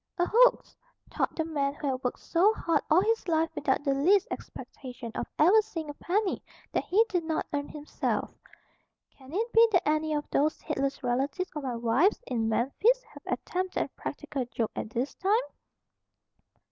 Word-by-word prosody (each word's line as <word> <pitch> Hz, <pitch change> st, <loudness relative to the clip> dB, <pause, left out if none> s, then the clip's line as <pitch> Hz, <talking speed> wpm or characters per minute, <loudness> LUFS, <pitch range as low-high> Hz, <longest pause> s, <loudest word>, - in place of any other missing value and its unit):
"A 350 Hz, -, +2 dB
hoax," -, -, +4 dB, 0.4 s
thought -, -, -1 dB
the 320 Hz, -, -1 dB
man 285 Hz, -3 st, -1 dB
who 295 Hz, -, -7 dB
had 255 Hz, 0 st, -4 dB
worked 250 Hz, -, -2 dB
so 385 Hz, +6 st, +3 dB
hard 330 Hz, -7 st, +1 dB
all 320 Hz, +4 st, +6 dB
his 450 Hz, -1 st, 0 dB
life 325 Hz, -1 st, +1 dB
without 265 Hz, +1 st, 0 dB
the 280 Hz, -2 st, +2 dB
least 365 Hz, +9 st, +3 dB
expectation 250 Hz, -3 st, -8 dB
of -, -, -3 dB
ever 375 Hz, +8 st, +6 dB
seeing 330 Hz, -8 st, -6 dB
a -, -, -10 dB
penny 385 Hz, +6 st, -1 dB, 0.3 s
that -, -, -1 dB
he 435 Hz, +5 st, +4 dB
did 355 Hz, -5 st, -1 dB
not 320 Hz, -1 st, -1 dB
earn 285 Hz, 0 st, -1 dB
himself. 300 Hz, 0 st, -3 dB, 0.8 s
"Can 265 Hz, 0 st, -16 dB
it 450 Hz, +7 st, -2 dB
be 460 Hz, +1 st, +7 dB
that 360 Hz, -, +3 dB
any 310 Hz, 0 st, +1 dB
of 295 Hz, -, -3 dB
those 300 Hz, +2 st, +1 dB
heedless 275 Hz, -3 st, -2 dB
relatives 275 Hz, +8 st, -1 dB
of 300 Hz, -, -3 dB
my 255 Hz, -3 st, -3 dB
wife's 240 Hz, -, +2 dB
in 230 Hz, -4 st, -1 dB
Memphis 405 Hz, -, +2 dB
have -, -, -15 dB
attempted 370 Hz, 0 st, -2 dB
a -, -, -8 dB
practical 270 Hz, -3 st, -5 dB
joke 230 Hz, -2 st, -3 dB
at -, -, -4 dB
this 250 Hz, +4 st, -2 dB
time?" 400 Hz, +4 st, +2 dB
310 Hz, 180 wpm, -28 LUFS, 270-375 Hz, 0.8 s, be